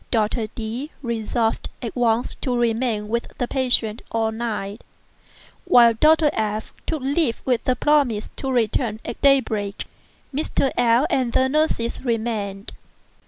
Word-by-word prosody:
Dr. 220 0 0
D—— 230 +6 -5
resolved 225 -1 -1
at 235 -3 -6
once 240 -1 +1
to 250 -2 -1
remain 230 -2 0
with 235 +2 -2
the 245 - -1
patient 245 -5 +1
all 225 -1 0
night, 220 -2 -4 0.8
while 240 -10 +6
Dr. 305 +5 +4
F—— 215 0 -2
took 310 -5 -2
leave 275 -3 0
with 250 -1 0
a 255 - +3
promise 260 -6 +1
to 270 - -3
return 225 -2 0
at - - -6
daybreak. 220 -8 +2 0.5
Mr. 275 -1 0
L—l 240 +3 +3
and 250 -3 +1
the 260 - +3
nurses 270 -6 0
remained. 220 -4 -2
235 Hz, 135 wpm, -22 LUFS, 220-260 Hz, 0.8 s, while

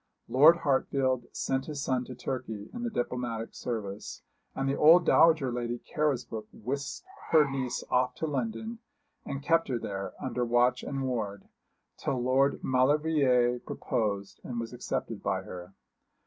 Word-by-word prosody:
Lord 145 +8 +7
Hartfield 130 -2 +1
sent 135 0 -2
his 145 -3 -4
son 125 -1 0
to 125 - -8
Turkey 120 -5 -5
in 240 - -5
the 240 - -1
diplomatic 120 - -3
service; 105 -4 -5 0.3
and 135 - -1
the 135 - +1
old 165 +3 +7
dowager 160 -8 +5
Lady 120 0 -2
Carrisbrook 125 -7 -2
whisked 140 - -5 0.2
her 155 -3 +6
niece 135 -2 -3
off 125 0 +2
to - - -2
London, 220 +8 -3 0.5
and 140 0 -4
kept 165 +1 +3
her 130 -3 -1
there, 100 -3 -5
under 125 - -2
watch 120 +1 +3
and 135 -1 -3
ward, 105 -6 -3 0.5
till 130 - -1
Lord 130 +3 +2
Maulevrier 130 -2 +3
proposed 100 -5 -3
and 120 -2 -4
was 115 +1 -5
accepted 125 - -4
by - - -1
her. 90 +1 -9
130 Hz, 150 wpm, -29 LUFS, 120-140 Hz, 0.5 s, Lord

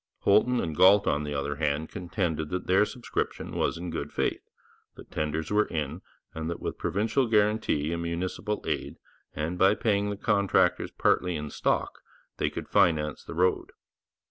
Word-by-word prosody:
Holton 120 +5 +4
and 80 -2 -2
Galt, 95 +5 +6
on 75 +1 +1
the 75 0 -4
other 70 +1 -2
hand, 75 0 -1
contended 85 -5 -2
that 90 +2 -3
their 95 +3 +4
subscription 120 +1 -4
was - - 0
in 85 0 -5
good - - -4
faith, - - -1 0.5
that - - -14
tenders 75 +2 -2
were 105 +1 +3
in, 75 -2 -3 0.3
and 80 0 -4
that 85 - -4
with - - -5
provincial 110 +6 0
guarantee 105 -8 +1
and 85 - -3
municipal 90 +5 -3
aid, - - -3 0.4
and 80 +4 -3
by 95 +2 +5
paying 105 -2 +1
the 100 - -4
contractors 100 -3 +2
partly 90 -1 +1
in 75 -1 -5
stock, - - -1 0.4
they - - 0
could - - -6
finance 75 -4 +2
the - - -8
road. 90 +2 +1
90 Hz, 170 wpm, -28 LUFS, 80-105 Hz, 0.5 s, Galt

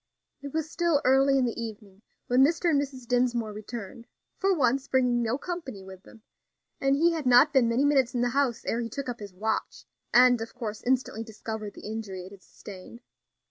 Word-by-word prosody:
It 280 0 -7
was 315 +1 -2
still 340 -4 +2
early 270 +1 +4
in 260 - +2
the 235 -1 -3
evening 210 -3 -9 0.2
when 250 +2 +4
Mr. 335 +3 +2
and 285 -2 +3
Mrs. 265 -3 -7
Dinsmore 240 -3 0
returned 215 +1 -8 0.3
for 390 0 +2
once, 275 -5 +1
bringing 250 -3 +2
no 230 +2 0
company 285 - -6
with 190 -1 -12
them; 220 +2 -18 0.6
and 275 0 +2
he 335 +4 +3
had 315 -5 -3
not 250 +5 +6
been 255 -4 +4
many 245 +5 +2
minutes 270 -4 +2
in 240 - +1
the 245 - +2
house 255 -2 0
ere 235 - -1
he 230 - -4
took 275 +4 -5
up 240 - -5
his 205 -2 -8
watch, 220 +3 -3 0.3
and 245 -1 +6
of 225 - -7
course 220 -4 -5
instantly 250 -3 0
discovered 220 -1 -7
the - - -11
injury 215 -4 -5
it 190 - -12
had 200 -2 -14
sustained. 200 +5 -12
245 Hz, 205 wpm, -27 LUFS, 220-275 Hz, 0.6 s, not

